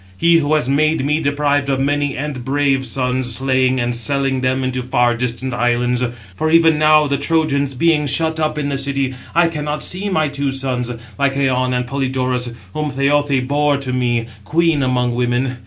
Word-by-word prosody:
He 170 Hz, -, +4 dB
who 155 Hz, 0 st, +1 dB
has 150 Hz, -5 st, 0 dB
made 150 Hz, +1 st, +1 dB
me 150 Hz, +2 st, +1 dB
deprived 145 Hz, -1 st, 0 dB
of 135 Hz, -1 st, 0 dB
many 145 Hz, +1 st, 0 dB
and 140 Hz, -3 st, -4 dB
brave 135 Hz, 0 st, 0 dB
sons, 125 Hz, 0 st, -1 dB
slaying, 130 Hz, -1 st, +1 dB
and 120 Hz, 0 st, -1 dB
selling 135 Hz, +2 st, 0 dB
them 130 Hz, +1 st, 0 dB
into 130 Hz, 0 st, -2 dB
far 120 Hz, -1 st, +1 dB
distant 125 Hz, +1 st, -2 dB
islands. 120 Hz, 0 st, 0 dB, 0.3 s
For 155 Hz, +11 st, -1 dB
even 165 Hz, -1 st, +4 dB
now 155 Hz, 0 st, +5 dB
the 140 Hz, -1 st, -1 dB
Trojans 140 Hz, -3 st, 0 dB
being 150 Hz, +1 st, +2 dB
shut 160 Hz, +3 st, 0 dB
up 155 Hz, -1 st, -1 dB
in 145 Hz, -1 st, -2 dB
the 140 Hz, -1 st, -2 dB
city, 135 Hz, -1 st, -1 dB, 0.2 s
I 170 Hz, 0 st, +4 dB
cannot 150 Hz, -2 st, -3 dB
see 195 Hz, +3 st, -1 dB
my 155 Hz, -5 st, +1 dB
two 140 Hz, -1 st, -2 dB
sons, 130 Hz, -2 st, -3 dB, 0.3 s
Lycaon 135 Hz, -2 st, +1 dB
and 125 Hz, 0 st, -1 dB
Polydorus, 130 Hz, -2 st, -1 dB, 0.2 s
whom 150 Hz, -1 st, -2 dB
Laothoë 140 Hz, -1 st, +1 dB
bore 145 Hz, 0 st, +1 dB
to 135 Hz, -2 st, -4 dB
me, 120 Hz, -2 st, 0 dB, 0.2 s
queen 160 Hz, +5 st, +1 dB
among 125 Hz, -2 st, 0 dB
women. 125 Hz, +1 st, -1 dB
135 Hz, 180 wpm, -18 LUFS, 125-150 Hz, 0.3 s, now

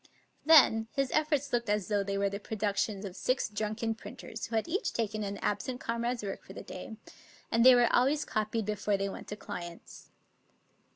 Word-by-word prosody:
Then 265 Hz, -8 st, +6 dB
his 275 Hz, -2 st, 0 dB
efforts 295 Hz, -3 st, +1 dB
looked 235 Hz, -2 st, 0 dB
as 210 Hz, -2 st, +1 dB
though 205 Hz, -2 st, +1 dB
they 200 Hz, 0 st, -2 dB
were 200 Hz, 0 st, +2 dB
the 200 Hz, 0 st, -4 dB
produc 210 Hz, -1 st, -2 dB
tions 205 Hz, -2 st, -1 dB
of 185 Hz, -2 st, -7 dB
six 255 Hz, +4 st, 0 dB
drunken 215 Hz, +2 st, -2 dB
printers 220 Hz, 0 st, -8 dB
who 230 Hz, -, -4 dB
had 220 Hz, -, +1 dB
each 370 Hz, +5 st, -1 dB
taken 215 Hz, -2 st, -2 dB
an 200 Hz, 0 st, -4 dB
absent 225 Hz, +5 st, -1 dB
comrade's 235 Hz, 0 st, -2 dB
work 195 Hz, -1 st, -5 dB
for -, -, -12 dB
the -, -, -8 dB
day; 215 Hz, +4 st, -8 dB, 0.5 s
and 230 Hz, 0 st, +4 dB
they 255 Hz, 0 st, +9 dB
were 245 Hz, -1 st, +4 dB
always 280 Hz, +4 st, +3 dB
copied 215 Hz, 0 st, -1 dB
before 210 Hz, -1 st, 0 dB
they 195 Hz, 0 st, -1 dB
went -, -, -8 dB
to 210 Hz, -, -5 dB
clients. 175 Hz, -4 st, -9 dB
220 Hz, 195 wpm, -31 LUFS, 205-245 Hz, 0.5 s, they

